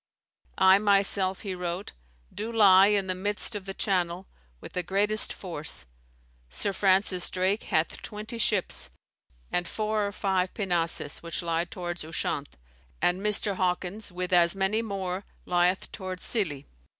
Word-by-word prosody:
"I 190 +1 +6
myself," 195 -2 +2
he 195 -3 -4
wrote, 180 +2 -4 0.4
"do 220 +2 -4
lie 200 -4 +7
in 205 -2 +2
the 185 - -1
midst 205 +4 -2
of 205 -2 -5
the 195 - -5
Channel, 180 -2 -1 0.3
with - - -11
the 180 - -1
greatest 205 +4 +2
force; 155 - -4 0.6
Sir 200 - -1
Francis 190 -2 +2
Drake 190 +4 0
hath 160 +1 0
twenty 215 +2 -7
ships, 210 -4 +2 0.6
and 175 -1 0
four 215 0 -1
or - - -4
five 190 -2 -1
pinnaces, 170 -7 -1
which 170 +1 -4
lie 165 0 0
towards 175 -1 -5
Ushant; 155 -2 -4 0.4
and 180 +2 +1
Mr. 205 -1 +2
Hawkins, 185 +3 -2
with 180 +1 -3
as 170 +1 +5
many 195 +3 +1
more, 195 -3 -3 0.2
lieth 180 +1 +1
towards 185 -2 -6
Scilly. 155 - +1
190 Hz, 145 wpm, -27 LUFS, 175-205 Hz, 0.6 s, lie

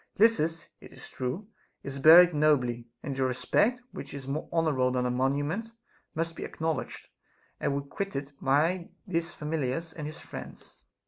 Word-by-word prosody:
Lysis, 170 -7 +3
it - - -13
is - - -11
true, 130 +12 -4 0.4
is 140 0 -6
buried 170 +4 +9
nobly, 130 -6 +2 0.2
and 140 - -3
your 130 -1 +1
respect, 220 - +1
which 140 - -8
is 135 -2 -7
more 145 +3 -3
honorable 155 -6 +2
than 125 0 0
a 125 - +1
monument, 145 - -1 0.4
must 165 +1 -1
be - - -8
acknowl 160 0 -1
edged - - -12 0.5
and 140 - 0
requited 140 0 -4
by 160 +6 +2 0.2
his 170 -3 -2
familiars 155 +1 -2
and 150 -2 -5
his 155 - -6
friends. - - -10
150 Hz, 155 wpm, -29 LUFS, 135-165 Hz, 0.5 s, buried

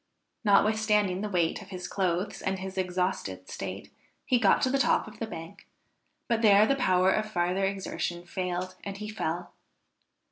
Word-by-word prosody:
Notwithstanding 210 -2 +3
the 210 - -2
weight 175 0 0
of 195 - -12
his 180 -2 -6
clothes 185 0 -1
and 190 0 -1
his 190 0 -6
exhausted 180 - -2
state, - - -6 0.3
he 250 - +3
got 200 -5 +4
to 255 - +2
the 275 - +2
top 240 - +2
of 215 - -12
the 225 - -3
bank, 165 -4 -9 0.6
but 230 -2 +1
there 210 -1 +7
the 275 - +2
power 185 -7 +3
of 215 +1 0
farther 180 +1 +1
exertion 190 -3 -3
failed, 180 0 -3
and 200 -1 -5
he 210 +1 -6
fell. 175 -4 -3
190 Hz, 170 wpm, -28 LUFS, 180-215 Hz, 0.6 s, there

